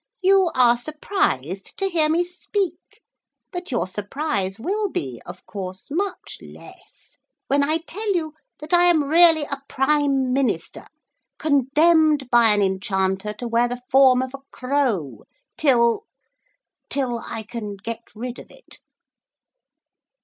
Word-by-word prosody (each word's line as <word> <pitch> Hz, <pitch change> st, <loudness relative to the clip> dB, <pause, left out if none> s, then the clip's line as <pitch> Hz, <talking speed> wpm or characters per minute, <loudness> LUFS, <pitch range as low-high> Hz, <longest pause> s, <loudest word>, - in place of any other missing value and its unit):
'You 380 Hz, -1 st, +5 dB
are 240 Hz, -1 st, +5 dB
surprised 240 Hz, -, -2 dB
to 390 Hz, -, 0 dB
hear 325 Hz, -5 st, +2 dB
me 335 Hz, +3 st, +2 dB
speak, 370 Hz, +2 st, -5 dB, 0.5 s
but 355 Hz, -1 st, -6 dB
your 240 Hz, -6 st, 0 dB
surprise 205 Hz, 0 st, -3 dB
will 405 Hz, -, -1 dB
be, 130 Hz, -, -4 dB
of -, -, -10 dB
course, 190 Hz, -2 st, -7 dB
much 380 Hz, +4 st, -3 dB
less -, -, -16 dB, 0.3 s
when 280 Hz, +1 st, +3 dB
I 310 Hz, +3 st, +1 dB
tell 420 Hz, +5 st, -3 dB
you 315 Hz, -3 st, -2 dB, 0.3 s
that 305 Hz, +3 st, -6 dB
I 350 Hz, 0 st, +6 dB
am 340 Hz, -4 st, +4 dB
really 325 Hz, +1 st, +5 dB
a 280 Hz, -1 st, -5 dB
Prime 270 Hz, -2 st, +1 dB
Minister 230 Hz, -11 st, -1 dB, 0.5 s
condemned 300 Hz, 0 st, +3 dB
by 235 Hz, -2 st, +6 dB
an 205 Hz, -1 st, +3 dB
Enchanter 190 Hz, +1 st, -1 dB
to 240 Hz, +4 st, -6 dB
wear 235 Hz, +1 st, +2 dB
the 245 Hz, 0 st, -6 dB
form 260 Hz, -1 st, +6 dB
of 260 Hz, 0 st, -7 dB
a 275 Hz, -, -8 dB
crow 250 Hz, -, -2 dB, 0.3 s
till... 255 Hz, -, +2 dB, 0.8 s
till 250 Hz, -4 st, -1 dB
I 225 Hz, -, -6 dB
can 215 Hz, -2 st, -6 dB
get 225 Hz, +3 st, -6 dB
rid 245 Hz, +2 st, -6 dB
of -, -, -13 dB
it.' -, -, -15 dB
270 Hz, 135 wpm, -22 LUFS, 225-315 Hz, 0.8 s, I